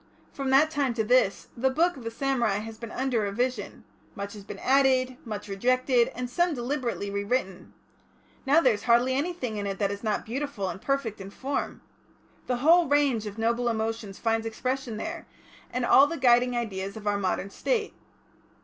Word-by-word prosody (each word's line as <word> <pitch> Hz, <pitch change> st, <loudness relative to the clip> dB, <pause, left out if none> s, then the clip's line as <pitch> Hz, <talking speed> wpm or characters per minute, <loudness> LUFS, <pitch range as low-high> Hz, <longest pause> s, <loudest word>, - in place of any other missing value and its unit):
From 275 Hz, -1 st, -3 dB
that 285 Hz, +4 st, +5 dB
time 275 Hz, -6 st, 0 dB
to 220 Hz, -, +1 dB
this, 230 Hz, -3 st, +2 dB
the 265 Hz, +3 st, +1 dB
Book 335 Hz, +6 st, +2 dB
of 260 Hz, -, -10 dB
the 230 Hz, -, -3 dB
Samurai 235 Hz, -4 st, 0 dB
has 220 Hz, +1 st, -7 dB
been 230 Hz, -, -7 dB
under 255 Hz, -1 st, -1 dB
revision, 220 Hz, +2 st, -2 dB, 0.3 s
much 200 Hz, 0 st, -5 dB
has 205 Hz, -2 st, -10 dB
been -, -, -8 dB
added, 260 Hz, -1 st, +3 dB
much 210 Hz, -2 st, -6 dB
rejected, 245 Hz, +4 st, +2 dB
and 250 Hz, 0 st, -3 dB
some 345 Hz, +6 st, +1 dB
deliberately 240 Hz, -5 st, -3 dB
rewritten. 200 Hz, -1 st, -2 dB, 0.7 s
Now, 290 Hz, +4 st, +4 dB
there 255 Hz, -6 st, +4 dB
is 205 Hz, -, -6 dB
hardly 240 Hz, +2 st, +4 dB
anything 275 Hz, -6 st, -2 dB
in 200 Hz, -1 st, -3 dB
it 195 Hz, -1 st, -3 dB
that 200 Hz, -1 st, 0 dB
is 200 Hz, +1 st, -6 dB
not 215 Hz, -2 st, -1 dB
beautiful 235 Hz, -5 st, -3 dB
and 190 Hz, -, -7 dB
perfect 245 Hz, -5 st, -2 dB
in 195 Hz, -, -7 dB
form. 275 Hz, +7 st, -4 dB, 0.7 s
The 250 Hz, -, 0 dB
whole 340 Hz, +1 st, +6 dB
range 275 Hz, -6 st, +2 dB
of 205 Hz, +1 st, -7 dB
noble 235 Hz, +2 st, +1 dB
emotions 220 Hz, -3 st, -3 dB
finds 225 Hz, -1 st, 0 dB
expression 250 Hz, 0 st, -3 dB
there, 330 Hz, +7 st, -5 dB, 0.4 s
and 245 Hz, 0 st, -1 dB
all 275 Hz, +3 st, +7 dB
the 335 Hz, -, -4 dB
guiding 245 Hz, -2 st, +4 dB
ideas 200 Hz, -3 st, -4 dB
of 215 Hz, -, -10 dB
our 205 Hz, -1 st, +1 dB
Modern 195 Hz, 0 st, -2 dB
State. 440 Hz, -, -1 dB
240 Hz, 185 wpm, -27 LUFS, 210-270 Hz, 0.7 s, all